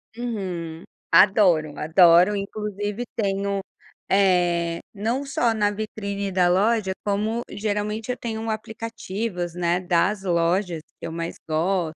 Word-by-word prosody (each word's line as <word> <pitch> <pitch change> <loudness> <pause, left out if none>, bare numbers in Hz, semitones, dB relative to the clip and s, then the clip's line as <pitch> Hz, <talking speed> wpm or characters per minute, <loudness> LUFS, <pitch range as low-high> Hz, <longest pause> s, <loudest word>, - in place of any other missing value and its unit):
Uhum, 185 -9 -4 0.3
adoro, 180 -7 +5
adoro 175 +4 +5
e 200 - -1
inclusive 205 +2 -4
tenho, 200 -2 -1 0.5
eh, 175 -3 +2
não 230 +7 -2
só 235 -4 +1
na 205 -1 +2
vitrine 200 -2 -4
da 180 -1 +3
loja, 195 +1 +2
como 215 +4 -1
geralmente 210 +2 -2
eu 250 - -4
tenho 225 -2 -4
um 225 0 -2
aplicativos, 215 -5 -4
né, 175 0 +1
das 185 +3 +1
lojas 175 -1 0 0.2
que - - -5
eu - - -6
mais 165 +1 -4
gosto, 165 0 0
200 Hz, 130 wpm, -24 LUFS, 175-215 Hz, 0.5 s, adoro